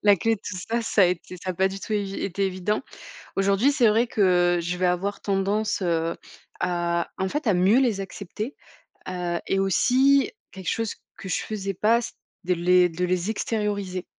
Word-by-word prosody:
la 205 Hz, -1 st, +6 dB
clé 225 Hz, +5 st, +1 dB
de -, -, -22 dB
tout 195 Hz, -4 st, -6 dB
ça, 230 Hz, +6 st, -2 dB
ça 205 Hz, -3 st, +4 dB
été 180 Hz, +1 st, -3 dB
ça 185 Hz, -, -2 dB
a 180 Hz, -, -4 dB
pas 190 Hz, +2 st, +2 dB
du 195 Hz, +1 st, -6 dB
tout -, -, -5 dB
évi 200 Hz, -2 st, -1 dB
été 195 Hz, +1 st, -1 dB
évident. 185 Hz, +3 st, -1 dB, 0.6 s
Aujourd'hui, 200 Hz, +8 st, +3 dB
c'est 255 Hz, -6 st, +4 dB
vrai 225 Hz, +3 st, +3 dB
que 180 Hz, -4 st, +3 dB
je 175 Hz, +1 st, -3 dB
vais 185 Hz, -, +1 dB
avoir 195 Hz, +3 st, -1 dB
tendance, 200 Hz, +1 st, 0 dB
heu, 165 Hz, -2 st, 0 dB, 0.4 s
à, 175 Hz, -1 st, 0 dB
en 190 Hz, 0 st, -1 dB
fait, 295 Hz, +1 st, -3 dB
à 205 Hz, -, +4 dB
mieux 190 Hz, +7 st, +4 dB
les 230 Hz, -7 st, +1 dB
accepter, 210 Hz, +6 st, -6 dB, 0.6 s
heu 175 Hz, -2 st, -2 dB
et 195 Hz, -, +1 dB
aussi 260 Hz, +8 st, +3 dB, 0.2 s
quelque 190 Hz, -3 st, -9 dB
chose 225 Hz, -2 st, -2 dB, 0.2 s
que 190 Hz, -, -8 dB
je -, -, 0 dB
faisais 200 Hz, -2 st, -4 dB
pas, 225 Hz, +5 st, +3 dB
c'est -, -, -6 dB, 0.3 s
de 180 Hz, -, +2 dB
les 180 Hz, +1 st, +4 dB
de 175 Hz, +2 st, -2 dB
les 180 Hz, +2 st, -1 dB
extérioriser. 205 Hz, -4 st, -2 dB
195 Hz, 195 wpm, -25 LUFS, 180-215 Hz, 0.6 s, la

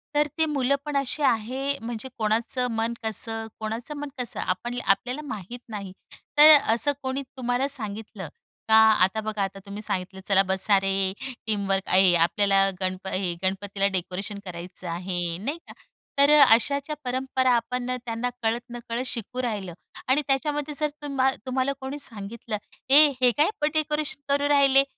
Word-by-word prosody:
तर 295 Hz, 0 st, +3 dB
ती 320 Hz, -, +3 dB
मुलं 280 Hz, -3 st, +1 dB
पण 295 Hz, -1 st, -4 dB
अशी 275 Hz, +2 st, -1 dB
आहे 260 Hz, +5 st, 0 dB
म्हणजे 235 Hz, +2 st, -6 dB
कोणाचं 230 Hz, +3 st, 0 dB
मन 225 Hz, +1 st, 0 dB
कसं 225 Hz, +1 st, 0 dB
कोणाचं 225 Hz, +6 st, -4 dB
मन 290 Hz, 0 st, -5 dB
कसं? 245 Hz, -4 st, -2 dB
आपण 240 Hz, +7 st, -3 dB
आपल्याला 250 Hz, +8 st, 0 dB
माहीत 220 Hz, +1 st, -7 dB
नाही 200 Hz, -3 st, -6 dB, 0.5 s
तर 300 Hz, +1 st, +10 dB
अ, 225 Hz, -, +1 dB
असं 235 Hz, +5 st, +2 dB
कोणी 265 Hz, +1 st, -2 dB, 0.2 s
तुम्हाला 245 Hz, +2 st, 0 dB
सांगितलं 215 Hz, -, -5 dB, 0.4 s
का, 220 Hz, -, +6 dB
आता 220 Hz, -2 st, +5 dB
बघा, 215 Hz, -1 st, -3 dB
आता 195 Hz, 0 st, -5 dB
तुम्ही 200 Hz, +1 st, -7 dB
सांगितलं, 190 Hz, -1 st, -3 dB
"चला 195 Hz, -1 st, +5 dB
बसा 190 Hz, +2 st, +3 dB
रे 195 Hz, 0 st, 0 dB, 0.3 s
टीमवर्क 195 Hz, -2 st, 0 dB
आहे 185 Hz, -1 st, +5 dB
आपल्याला 195 Hz, +3 st, +3 dB
गणप 185 Hz, +1 st, -3 dB
हे 185 Hz, -2 st, -1 dB
गणपतीला 195 Hz, +1 st, 0 dB
डेकोरेशन 190 Hz, +3 st, -3 dB
करायचं 180 Hz, 0 st, -7 dB
आहे" 175 Hz, 0 st, -3 dB
नाही 290 Hz, +5 st, -2 dB
का? -, -, -11 dB, 0.5 s
तर 280 Hz, +1 st, +6 dB
अ, -, -, +10 dB
अशाच्या 280 Hz, +5 st, -1 dB
परंपरा 260 Hz, 0 st, 0 dB
आपण 245 Hz, +2 st, -2 dB, 0.2 s
त्यांना 230 Hz, +1 st, -2 dB
कळत-नकळत 235 Hz, +1 st, -3 dB
शिकवू 250 Hz, 0 st, -3 dB
राहिलो 205 Hz, -7 st, -3 dB, 0.3 s
आणि 265 Hz, +4 st, +3 dB
त्याच्यामध्ये 295 Hz, +2 st, -1 dB
जर 300 Hz, -, +2 dB
तुम्हा 275 Hz, -2 st, +1 dB, 0.2 s
तुम्हाला 260 Hz, +1 st, 0 dB
कोणी 270 Hz, +2 st, -5 dB
सांगितलं, 220 Hz, -2 st, -5 dB, 0.3 s
"ए, 295 Hz, +3 st, +8 dB
हे 250 Hz, -1 st, +5 dB
काय 300 Hz, +5 st, +4 dB, 0.2 s
डेकोरेशन 300 Hz, -2 st, -1 dB
करू 285 Hz, 0 st, +1 dB
राहिले, 275 Hz, -1 st, +5 dB
230 Hz, 155 wpm, -25 LUFS, 195-270 Hz, 0.5 s, तर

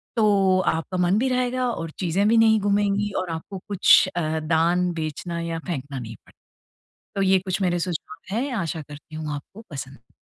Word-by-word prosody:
तो 195 Hz, -4 st, +4 dB
आपका 165 Hz, +3 st, -1 dB
मन 180 Hz, +2 st, +3 dB
भी 260 Hz, -, +1 dB
रहेगा 255 Hz, 0 st, 0 dB
और 165 Hz, -6 st, -4 dB
चीज़ें 190 Hz, +3 st, +1 dB
भी 230 Hz, +1 st, +4 dB
नहीं 220 Hz, -1 st, +5 dB
गूमेंगी 205 Hz, 0 st, +1 dB
और 185 Hz, -, -4 dB
आपको 165 Hz, +4 st, -6 dB
कुछ 200 Hz, -2 st, +6 dB
अ, 160 Hz, -2 st, 0 dB
दान, 170 Hz, +3 st, +2 dB
बेचना 165 Hz, +1 st, -4 dB
या 165 Hz, -1 st, -3 dB
फेंकना 140 Hz, -5 st, -4 dB
नहीं 115 Hz, -1 st, -7 dB
पड़े। -, -, -21 dB, 0.8 s
तो 195 Hz, -, 0 dB
ये 190 Hz, 0 st, +5 dB
कुछ 185 Hz, +1 st, -3 dB
मेरे 175 Hz, -1 st, +1 dB
सुझाव 180 Hz, +3 st, -5 dB
है, 275 Hz, +4 st, -1 dB
आशा 160 Hz, -2 st, -3 dB
करती 150 Hz, +1 st, -12 dB
हूँ 155 Hz, -1 st, -4 dB
आपको 190 Hz, +10 st, -9 dB
पसंद 135 Hz, -4 st, -9 dB
180 Hz, 180 wpm, -24 LUFS, 160-200 Hz, 0.8 s, कुछ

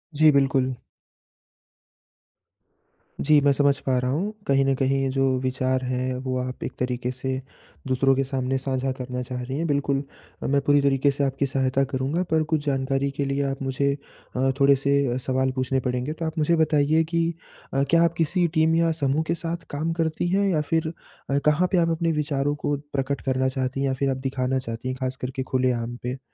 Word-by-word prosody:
जी, 155 Hz, +1 st, +6 dB
बिल्कुल। 135 Hz, -2 st, +2 dB, 2.5 s
जी, 155 Hz, -1 st, +7 dB
मैं 140 Hz, 0 st, +4 dB
समझ 140 Hz, 0 st, +3 dB
पा 130 Hz, -1 st, +2 dB
रहा 125 Hz, 0 st, -1 dB
हूँ। 180 Hz, +10 st, -1 dB, 0.2 s
कहीं 135 Hz, 0 st, +4 dB
न 135 Hz, -, +3 dB
कहीं 135 Hz, +1 st, +1 dB
ये 135 Hz, -, +1 dB
जो 135 Hz, 0 st, +1 dB, 0.2 s
विचार 130 Hz, 0 st, 0 dB
हैं 130 Hz, 0 st, -1 dB
वो 130 Hz, -1 st, -1 dB
आप 125 Hz, 0 st, -5 dB
एक -, -, -3 dB
तरीक़े 125 Hz, 0 st, -1 dB
से 130 Hz, +1 st, -4 dB, 0.6 s
दूसरों 135 Hz, +1 st, +3 dB
के 135 Hz, -, +1 dB
सामने 135 Hz, -1 st, -1 dB
साझा 130 Hz, 0 st, -1 dB
करना 125 Hz, 0 st, -4 dB
चाह 125 Hz, 0 st, -5 dB
रही 130 Hz, +2 st, -4 dB
हैं 165 Hz, -, -1 dB
बिल्कुल, 140 Hz, -1 st, 0 dB, 0.4 s
मैं 140 Hz, +1 st, +2 dB
पूरी 145 Hz, +1 st, +4 dB
तरीक़े 140 Hz, 0 st, +3 dB
से 140 Hz, +1 st, -2 dB
आपकी 135 Hz, 0 st, 0 dB
सहायता 135 Hz, 0 st, +1 dB
करूँगा। 140 Hz, +6 st, 0 dB
पर 160 Hz, -1 st, +3 dB
कुछ 150 Hz, -2 st, +1 dB
जानकारी 135 Hz, 0 st, 0 dB
के 140 Hz, -, 0 dB
लिए 140 Hz, +1 st, 0 dB
आप 135 Hz, +1 st, -5 dB
मुझे 135 Hz, +1 st, +1 dB, 0.4 s
अ, 135 Hz, +1 st, +2 dB
थोड़े 140 Hz, 0 st, +6 dB
से 140 Hz, +1 st, +1 dB, 0.2 s
अ, 125 Hz, -, -1 dB
सवाल 130 Hz, 0 st, 0 dB
पूछने 130 Hz, 0 st, 0 dB
पड़ेंगे। 125 Hz, +4 st, -2 dB
तो 165 Hz, +1 st, -5 dB
आप 160 Hz, +1 st, -4 dB
मुझे 160 Hz, +2 st, +3 dB
बताइए 155 Hz, 0 st, +3 dB
कि 170 Hz, 0 st, +1 dB, 0.4 s
अ, 135 Hz, +1 st, +2 dB
क्या 170 Hz, +2 st, +5 dB
आप 170 Hz, -1 st, +2 dB
किसी 170 Hz, +2 st, +2 dB
टीम 160 Hz, +1 st, +3 dB
या 165 Hz, 0 st, +3 dB
समूह 140 Hz, +3 st, +2 dB
के 170 Hz, -, +1 dB
साथ 170 Hz, 0 st, -4 dB
काम 155 Hz, +3 st, -2 dB
करती 160 Hz, +1 st, 0 dB
हैं 200 Hz, +2 st, +2 dB
या 160 Hz, -5 st, +2 dB
फिर 160 Hz, 0 st, +1 dB, 0.4 s
अ, 140 Hz, -, +2 dB
कहाँ 150 Hz, +4 st, +4 dB
पे 190 Hz, -, +3 dB
आप 165 Hz, -1 st, +3 dB
अपने 165 Hz, 0 st, +1 dB
विचारों 145 Hz, -2 st, 0 dB
को 145 Hz, -, +1 dB, 0.2 s
प्रकट 140 Hz, 0 st, -1 dB
करना 130 Hz, -1 st, +1 dB
चाहती 130 Hz, 0 st, -2 dB
हैं 140 Hz, -, +1 dB
या 135 Hz, -, +1 dB
फिर 135 Hz, +1 st, 0 dB
आप 130 Hz, -, -1 dB
दिखाना 130 Hz, 0 st, -1 dB
चाहती 115 Hz, 0 st, -6 dB
हैं, 130 Hz, 0 st, -2 dB
खास 130 Hz, 0 st, -1 dB
करके 130 Hz, +1 st, -3 dB
खुलेआम 125 Hz, -2 st, 0 dB
पे। 125 Hz, +2 st, -3 dB
135 Hz, 205 wpm, -24 LUFS, 130-150 Hz, 2.5 s, जी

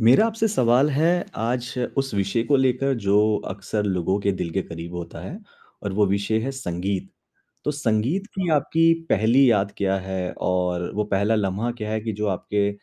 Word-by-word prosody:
मेरा 125 Hz, -, +6 dB
आपसे 225 Hz, 0 st, 0 dB
सवाल 130 Hz, -, +3 dB
है 165 Hz, +5 st, +2 dB
आज 120 Hz, +2 st, -2 dB, 0.2 s
उस 135 Hz, -1 st, 0 dB
विषय 100 Hz, +3 st, 0 dB
को 145 Hz, -, +3 dB
लेकर 130 Hz, +1 st, +2 dB
जो 100 Hz, +1 st, +4 dB, 0.3 s
अक्सर 100 Hz, +2 st, -3 dB
लोगों 95 Hz, 0 st, 0 dB
के 100 Hz, 0 st, +1 dB
दिल 90 Hz, -2 st, -3 dB
के 95 Hz, +3 st, -1 dB
क़रीब 85 Hz, +1 st, -8 dB
होता 85 Hz, -1 st, -7 dB
है 175 Hz, -, -7 dB, 0.4 s
और 100 Hz, -, -3 dB
वो 105 Hz, +1 st, +3 dB
विषय 100 Hz, +3 st, 0 dB
है 130 Hz, +4 st, -2 dB
संगीत, 95 Hz, -7 st, -3 dB, 0.6 s
तो 150 Hz, -, +1 dB
संगीत 140 Hz, -, 0 dB
की 185 Hz, -3 st, -1 dB
आपकी 165 Hz, +2 st, +3 dB, 0.2 s
पहली 120 Hz, +6 st, +4 dB
याद 100 Hz, -2 st, +1 dB
क्या 95 Hz, -1 st, +1 dB
है, 95 Hz, -1 st, -3 dB
और 90 Hz, -1 st, -1 dB
वो 105 Hz, -, +1 dB
पहला 100 Hz, +2 st, +1 dB
लम्हा 105 Hz, +3 st, -1 dB
क्या 110 Hz, -3 st, -6 dB
है 110 Hz, -, 0 dB
कि 110 Hz, +1 st, -3 dB
जो 105 Hz, +1 st, -2 dB
आपके 100 Hz, +1 st, 0 dB
105 Hz, 185 wpm, -23 LUFS, 95-130 Hz, 0.6 s, मेरा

